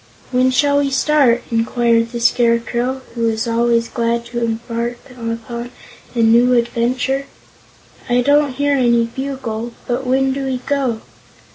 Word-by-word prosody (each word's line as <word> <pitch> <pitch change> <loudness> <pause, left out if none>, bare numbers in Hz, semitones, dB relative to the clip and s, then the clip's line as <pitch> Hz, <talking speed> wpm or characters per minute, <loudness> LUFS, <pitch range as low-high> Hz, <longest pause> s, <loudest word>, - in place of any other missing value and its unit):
"When 255 0 +3
shall 285 +2 +2
we 280 -1 +1
start?" 270 -3 +3
inquired 230 0 +1
the 240 - -4
Scarecrow, 240 +2 +1
who 230 -1 0
was 220 0 -1
always 230 0 +1
glad 235 0 -1
to 240 -1 -2
embark 235 +1 -3
upon 235 0 -5 0.5
a 230 - +2
new 235 +3 +5
adventure. 245 +3 0 0.8
"I 245 +1 +3
don't 285 +1 +3
hear 285 +2 +1
any 235 -3 +3
bugle, 235 -2 -5
but 250 +1 -2
when 265 +1 +2
do 275 0 -3
we 260 -1 -1
go?" 265 -6 -1
240 Hz, 140 wpm, -18 LUFS, 230-265 Hz, 0.8 s, new